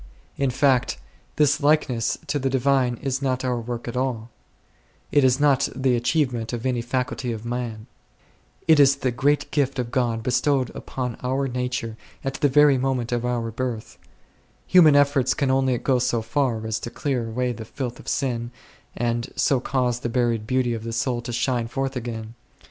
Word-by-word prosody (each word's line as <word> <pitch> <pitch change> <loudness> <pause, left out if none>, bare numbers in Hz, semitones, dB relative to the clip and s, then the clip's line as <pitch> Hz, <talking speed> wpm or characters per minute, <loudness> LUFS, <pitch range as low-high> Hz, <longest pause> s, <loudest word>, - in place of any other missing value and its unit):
In 140 -1 0
fact 130 0 +2 0.4
this 150 0 +3
likeness 140 -6 +2
to 145 +1 -1
the 135 0 0
divine 130 -2 +2
is 135 0 -1
not 130 -1 -1
our 125 -2 -1
work 120 +1 -5
at 120 - -5
all; 125 -3 -2 0.8
it 145 -1 +4
is 130 0 +3
not 140 -2 +3
the 130 -2 +2
achievement 120 -1 0
of 120 +1 -4
any 125 -2 0
faculty 125 0 -2
of 115 0 -6
man; 120 -3 -4 0.8
it 160 -2 +6
is 140 -1 +6
the 130 -2 -1
great 145 +5 +1
gift 140 -2 0
of 120 -2 -3
God 120 -4 0
bestowed 130 +1 +1
upon 125 -3 -5
our 130 +2 0
nature 125 -3 -3 0.3
at 135 - -2
the 145 - +4
very 145 -1 +5
moment 125 -3 -1
of 120 -1 0
our 120 -2 -1
birth; 115 -1 -5 0.7
human 160 -5 +6
efforts 140 -2 +3
can 140 -3 +1
only 130 -1 +2
go 130 +1 +1
so 120 -2 0
far 115 -2 -1
as 110 -1 -2
to - - -6
clear 125 -2 -2
away 125 +2 -1
the 115 -1 -7
filth 125 +1 -6
of - - -14
sin, 120 -3 -1 0.5
and 120 0 -1
so 135 - +2
cause 125 -2 0
the 120 - -3
buried 115 -3 0
beauty 130 -1 +1
of 110 -1 -5
the 115 0 -5
soul 120 +1 -1
to 120 - -6
shine 120 -1 0
forth 135 +2 -3
again. 115 -2 -5
125 Hz, 180 wpm, -24 LUFS, 120-135 Hz, 0.8 s, it